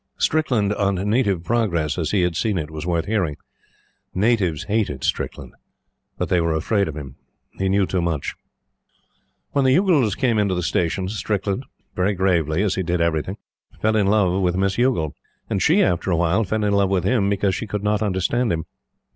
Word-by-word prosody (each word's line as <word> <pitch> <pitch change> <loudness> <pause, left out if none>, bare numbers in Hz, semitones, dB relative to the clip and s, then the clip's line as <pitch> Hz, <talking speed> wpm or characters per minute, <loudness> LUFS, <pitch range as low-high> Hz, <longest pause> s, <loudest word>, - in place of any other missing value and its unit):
Strickland 125 -10 +1
on 100 -1 0
Native 100 -2 +1
Progress 90 -9 0
as 80 - -1
he 100 -4 +2
had 90 -2 0
seen 105 +2 0
it 80 -2 -4
was 80 +1 -6
worth 85 -2 0
hearing. 95 -8 -1 0.8
Natives 95 -5 +1
hated 100 - -1
Strickland; - - -3 0.6
but - - -1
they 90 -2 +2
were 85 -1 0
afraid 100 +5 +1
of 80 -1 -6
him. 70 -4 -8 0.3
He 95 0 -2
knew 100 0 +3
too 95 -1 -1
much. 80 -4 -2 1.2
When 140 - +1
the 130 0 +4
Youghals 155 - +3
came 120 -5 +2
into 100 -3 +1
the 90 - -2
station, 90 +3 0
Strickland 105 +3 -2 0.3
very 95 +2 +1
gravely, 85 -2 +1
as 100 -3 +1
he - - -1
did 90 0 -1
everything 85 +3 0 0.4
fell 110 0 +1
in 105 -2 +2
love 100 -2 +2
with 90 -1 +1
Miss 95 0 +1
Youghal; 120 - +1 0.4
and - - 0
she, - - +4
after 90 +1 0
a 85 - +2
while, 85 +6 +2
fell 110 +3 -1
in 105 -1 +1
love 100 -1 +3
with 95 -3 +1
him 100 0 +2
because 100 -1 +1
she 105 +4 -4
could 105 0 -4
not 105 0 +1
understand 105 +4 0
him. 80 -1 -2
95 Hz, 190 wpm, -22 LUFS, 85-105 Hz, 1.2 s, the